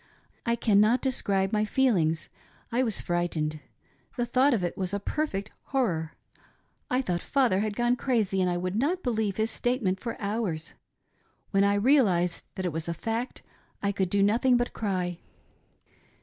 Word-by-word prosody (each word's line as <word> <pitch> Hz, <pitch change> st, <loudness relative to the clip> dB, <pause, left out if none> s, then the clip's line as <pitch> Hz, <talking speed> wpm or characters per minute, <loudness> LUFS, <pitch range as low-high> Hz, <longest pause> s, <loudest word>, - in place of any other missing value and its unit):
I 235 Hz, -, +3 dB
cannot 215 Hz, +1 st, +3 dB
describe 200 Hz, -7 st, 0 dB
my 210 Hz, 0 st, +2 dB
feelings; 195 Hz, -10 st, +1 dB, 0.4 s
I 240 Hz, +2 st, +2 dB
was 225 Hz, -5 st, +2 dB
frightened. 165 Hz, -3 st, -1 dB, 0.6 s
The 240 Hz, -, +1 dB
thought 255 Hz, +4 st, +3 dB
of 220 Hz, -8 st, +1 dB
it 175 Hz, -, -2 dB
was 190 Hz, +1 st, -2 dB
a -, -, -1 dB
per 305 Hz, +9 st, -1 dB
fect 195 Hz, -5 st, -5 dB
horror. 170 Hz, -, -1 dB, 0.7 s
I 255 Hz, +1 st, +1 dB
thought 175 Hz, -6 st, -1 dB
father 255 Hz, -9 st, +2 dB
had 210 Hz, 0 st, -1 dB
gone 240 Hz, +1 st, +2 dB
crazy, 220 Hz, -8 st, 0 dB
and 180 Hz, -, +2 dB
I 175 Hz, -, 0 dB
would 185 Hz, +2 st, -2 dB
not 320 Hz, -, 0 dB
believe 220 Hz, -5 st, -1 dB
his 220 Hz, +1 st, 0 dB
statement 235 Hz, -7 st, 0 dB
for 230 Hz, +2 st, -5 dB
hours. 200 Hz, -6 st, -2 dB, 0.8 s
When 195 Hz, 0 st, +3 dB
I 200 Hz, 0 st, +3 dB
realised 200 Hz, -, +3 dB
that 185 Hz, -, -3 dB
it 175 Hz, -, -1 dB
was 160 Hz, 0 st, -3 dB
<t 170 Hz, -, -1 dB
fact 225 Hz, +8 st, -4 dB, 0.4 s
I 200 Hz, -, +2 dB
could 190 Hz, -2 st, -1 dB
do 200 Hz, +1 st, +2 dB
nothing 240 Hz, +5 st, +4 dB
but 240 Hz, 0 st, -1 dB
cry. 180 Hz, -4 st, -2 dB
205 Hz, 170 wpm, -27 LUFS, 180-240 Hz, 0.8 s, nothing